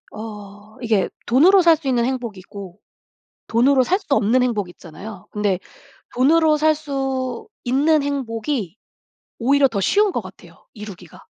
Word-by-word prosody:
어 210 0 -10
이게 220 -6 +1 0.2
돈으로 355 +11 +5
살 335 -2 +5
수 295 -3 -8
있는 240 -2 +1
행복이 240 -6 -4
있고 195 0 -11 0.7
돈으로 255 +3 +3
살 370 +10 +1
수 - - -23
없는 245 +4 +2
행복 210 -7 -1
있잖아요. 180 +4 -11
근데 205 -3 -1 0.6
돈으로 310 +4 +4
살 310 +1 +3
수 270 -4 -4 0.2
있는 285 +4 +2
행복이 235 - -3 0.6
오히려 275 +3 +3
더 215 -5 -3
쉬운 405 - +2
것 - - -1
같아요 - - -15
이루기가. 210 -4 -11
245 Hz, 285 characters per minute, -21 LUFS, 210-285 Hz, 0.7 s, 돈으로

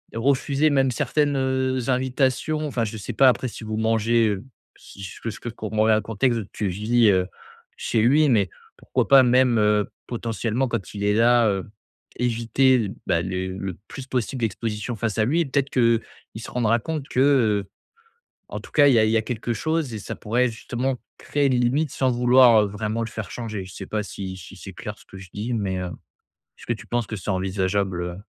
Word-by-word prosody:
refuser 140 +4 +2
même 135 -2 +3
certaines, 145 +4 0
heu, 130 0 0
invitations 130 +4 0
Enfin, 120 -5 -1
je 110 +1 -6
sais 100 - -6
pas. 135 -1 +6
Après, 125 +1 0
si 115 - -10
vous 110 0 -4
mangez, 115 +1 +2
heu, 100 +1 -3 0.3
si 100 - -12
ce 95 - -9
que 115 - -3
je 110 - -8
peux 120 - -5
f - - -19
comme 110 -1 -5
on 110 - +5
a 110 - +5
un 110 - +1
contexte 115 +2 0
de 100 - -8
tu 105 - -2
vis, 110 +4 +2
heu, 90 -2 +2 0.5
chez 115 - 0
lui 145 +6 +4
mais 100 -7 +3 0.3
pourquoi - - -1
pas 135 -1 +8
même, 125 -1 +4
heu, 105 -1 +2 0.2
potentiellement 115 +1 -2
quand 100 -6 -4
il 100 -1 -5
est 105 0 +2
là, 120 0 +4
heu, 95 -1 -3 0.5
éviter 125 +2 +2
l 105 -5 -2
bah, 85 - +2
les 95 +1 -3
le 95 -1 -5
plus 135 - -8
possible 130 0 -2
d'exposition 110 +1 -3
face 110 -2 -2
à 110 - +4
lui 150 +9 +1
et - - 0
peut-être 140 0 0
qu'il 115 -2 +3 0.4
se - - -8
rendra 115 -2 +2
compte 150 +2 -4
que, - - -1
heu, 110 -8 +3 0.8
en - - -5
tout - - -14
cas 145 -2 +5
il 140 - +5
y 115 - +5
a 110 - +4
il 110 - +1
y 115 - +3
a - - +2
quelque 120 0 -3
chose 155 +2 -1
et 110 - -4
ça - - -6
pourrait 120 +3 0
justement 125 +3 -3 0.2
créer 145 -2 0
les 125 - +2
limites 130 +5 +1
sans 130 -1 +1
vouloir, 120 -2 +6
heu, - - -1
vraiment 105 +3 -3
le 115 - -5
faire 110 -4 -6
changer. 110 -5 -5
Je 95 - -12
sais - - -7
pas 105 -1 -2
si 95 -1 -7
si 90 - -11
c'est - - -10
clair - - -7
ce - - -17
que 95 - -12
je 95 -1 -11
dis 110 +4 -4
mais, 100 -5 -1
heu, 90 - -3 0.7
est-ce - - -14
que - - +1
tu - - -11
penses 120 -1 -1
que 110 - -5
c'est 95 - -7
envisageable, 95 0 -1
heu, 90 0 -5
115 Hz, 225 wpm, -23 LUFS, 105-130 Hz, 0.8 s, pas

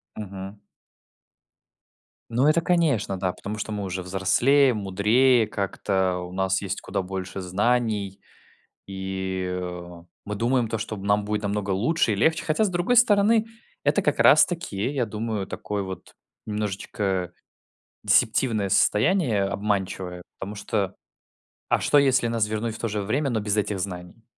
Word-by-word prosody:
Мгм. 100 -1 -7 1.7
Ну 120 +4 +1
это, 155 +2 +4
конечно, 150 - +1
да, 90 -1 -1
потому 105 +4 -7
что 105 +1 -4
мы 105 -1 -3
уже 95 0 -4
взрослее, 120 +9 +3
мудрее, 110 +4 +3
как-то 95 -2 -1
у 90 0 -7
нас 95 +1 0
есть 95 -1 -4
куда - - -2
больше 95 0 -5
знаний, 105 +1 0 0.7
и, 95 -1 -4
э, 90 -1 -6 0.2
мы 105 0 -4
думаем 120 +2 +1
то, 115 - -1
что 110 -1 -5
нам 100 +1 +1
будет 105 0 -2
намного 100 0 -2
лучше 115 - +1
и - - -1
легче, 160 +11 +2
хотя, 155 +8 +2
с - - 0
другой 180 +7 +1
стороны, 220 -1 +5 0.4
это - - +3
как - - 0
раз - - +7
таки, 150 - -3
я 125 -4 0
думаю, 105 -3 -3
такое 105 -1 -4
вот 95 -2 -9 0.3
немножечко 100 -3 -2 0.7
дисептивное 110 -3 +2
состояние, 110 - +3
обманчивое, 95 -3 -2 0.2
потому 100 +2 -6
что 100 -1 -2 0.7
а - - +3
что, 145 - +3
если 130 -3 +3
нас 115 -2 0
вернуть 110 +1 -3
в - - -10
то 115 - -1
же 105 0 -2
время, 135 +8 0
но 110 -2 0
без 105 0 -1
этих 105 -2 -1
знаний? 90 +3 -7
105 Hz, 150 wpm, -25 LUFS, 95-120 Hz, 1.7 s, раз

